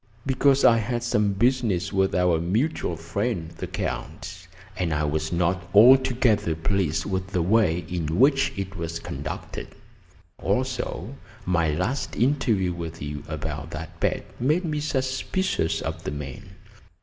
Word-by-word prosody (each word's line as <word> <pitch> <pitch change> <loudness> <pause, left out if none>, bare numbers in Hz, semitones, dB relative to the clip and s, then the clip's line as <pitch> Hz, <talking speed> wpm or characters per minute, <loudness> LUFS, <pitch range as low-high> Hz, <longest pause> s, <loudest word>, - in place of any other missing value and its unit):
"Because 135 +1 +3
I 115 -1 +6
had 120 +2 -2
some 105 -3 +1
business 110 -4 +1
with 95 0 +2
our 90 -2 +3
mutual 105 - 0
friend, 85 +1 -2
the - - -6
Count, 95 -1 -5 0.3
and 85 -4 -1
I 75 - 0
was 75 +1 -1
not 90 +1 0
altogether 120 -5 +5
pleased 85 -1 0
with 95 -2 -2
the 90 -2 0
way 90 -4 +2
in 85 -2 -2
which 135 +1 +4
it 95 0 -4
was 85 -1 -4
conducted. 75 -1 -6 0.7
Also, - - -2 0.3
my 85 -3 +2
last 90 - -1
interview 115 -8 +1
with 85 -1 -6
you 75 0 -5
about 75 -1 -5
that 80 +1 -9
bet - - 0 0.2
made 155 +8 +2
me 150 -2 -1
suspicious 130 - -1
of - - -4
the - - -3
man. 75 +6 -7
95 Hz, 140 wpm, -25 LUFS, 80-120 Hz, 0.7 s, I